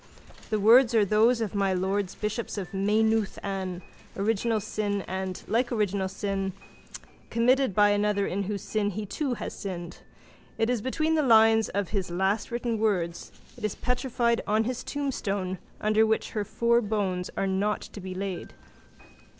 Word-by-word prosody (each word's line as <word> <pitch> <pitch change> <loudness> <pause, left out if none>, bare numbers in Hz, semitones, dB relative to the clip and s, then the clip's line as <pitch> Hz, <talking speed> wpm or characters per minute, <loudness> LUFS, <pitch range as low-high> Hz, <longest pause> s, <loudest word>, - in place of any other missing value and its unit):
The 215 -1 0
words 235 +3 +6
are 215 -2 +5
those 225 +4 +3
of 220 - -2
my 195 -2 +1
lords 190 +1 -1
bishops 215 +1 -3
of 190 -2 -5
Maynooth. 215 +2 +1
An 190 -2 -4 0.3
original 220 +2 +1
sin 205 -1 -2
and, 190 0 -4
like 240 +2 +1
original 205 -4 0
sin, 195 0 -3 0.8
committed 250 -1 +2
by 205 -1 +6
another 205 -1 +1
in 200 +1 -2
whose 200 0 -4
sin 210 -2 0
he 210 +2 -4
too 265 +4 -2
has - - -5
sinned. 175 -4 -6 0.6
It 225 +2 +1
is 245 -4 0
between 310 +6 0
the 315 - +3
lines 225 -4 +5
of 200 -2 -2
his 195 -4 -2
last 190 +4 0
written 235 -2 -2
words, 180 -6 -1 0.2
it - - -13
is 215 - -1
petrified 245 -2 0
on 215 +2 +2
his 250 +2 -3
tombstone 200 -10 -2 0.2
under 215 +1 +3
which 220 - 0
her 210 - -1
four 235 +3 +2
bones 200 -4 -1
are - - +1
not 195 +2 0
to 205 - -9
be 185 0 -6
laid. 190 -2 -5
210 Hz, 165 wpm, -27 LUFS, 195-225 Hz, 0.8 s, words